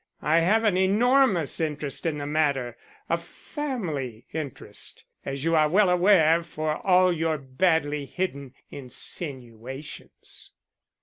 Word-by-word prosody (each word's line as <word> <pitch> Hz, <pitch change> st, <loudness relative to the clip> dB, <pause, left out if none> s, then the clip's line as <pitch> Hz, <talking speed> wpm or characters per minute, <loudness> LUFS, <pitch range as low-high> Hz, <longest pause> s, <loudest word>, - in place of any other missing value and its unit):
I 160 Hz, +2 st, +4 dB
have 210 Hz, +7 st, +3 dB
an 205 Hz, -4 st, +2 dB
enormous 205 Hz, -, +3 dB
interest 150 Hz, -1 st, -3 dB
in 155 Hz, -2 st, -1 dB
the 145 Hz, -, -4 dB
matter; 140 Hz, -5 st, 0 dB, 0.3 s
a 170 Hz, -, +1 dB
family 170 Hz, -, -5 dB
interest, 150 Hz, -6 st, -6 dB, 0.2 s
as 140 Hz, 0 st, -4 dB
you 165 Hz, 0 st, +2 dB
are 155 Hz, -1 st, +4 dB
well 190 Hz, +2 st, +4 dB
aware 175 Hz, -3 st, +5 dB
for 155 Hz, -2 st, -3 dB
all 185 Hz, -1 st, +4 dB
your 160 Hz, -1 st, 0 dB
badly 145 Hz, +1 st, 0 dB
hidden 140 Hz, -8 st, -4 dB, 0.2 s
insinuations." 130 Hz, -1 st, -8 dB
155 Hz, 120 wpm, -26 LUFS, 140-180 Hz, 0.3 s, aware